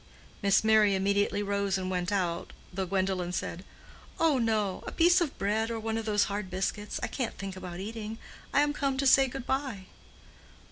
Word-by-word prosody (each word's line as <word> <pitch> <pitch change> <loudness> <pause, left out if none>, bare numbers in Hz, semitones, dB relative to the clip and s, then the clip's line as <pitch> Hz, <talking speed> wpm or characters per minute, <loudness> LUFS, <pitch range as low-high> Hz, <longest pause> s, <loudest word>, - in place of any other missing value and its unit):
Miss 200 +1 +4
Merry 215 -2 +5
immediately 200 +1 +1
rose 200 -1 0
and 185 -1 -3
went 180 +1 -1
out, 175 -4 -1 0.2
though 190 0 -2
Gwendolen 185 -1 0
said, 180 0 -4 0.6
"Oh, 315 -5 +3
no, 215 -5 0
a - - -3
piece 350 +2 +4
of 320 -5 -1
bread, 215 +3 0
or 230 -1 -3
one 220 0 -2
of 225 -1 -2
those 210 -2 +3
hard 200 -1 -3
biscuits. 195 +3 -2
I - - +1
can't 250 -4 -3
think 195 -1 -5
about 180 -1 -7
eating. 220 +2 -5 0.3
I 285 - +4
am 290 0 +2
come 275 -2 -1
to 275 - 0
say 270 0 +6
good 260 -1 -6
bye." 265 -8 -2
205 Hz, 190 wpm, -29 LUFS, 190-230 Hz, 0.6 s, say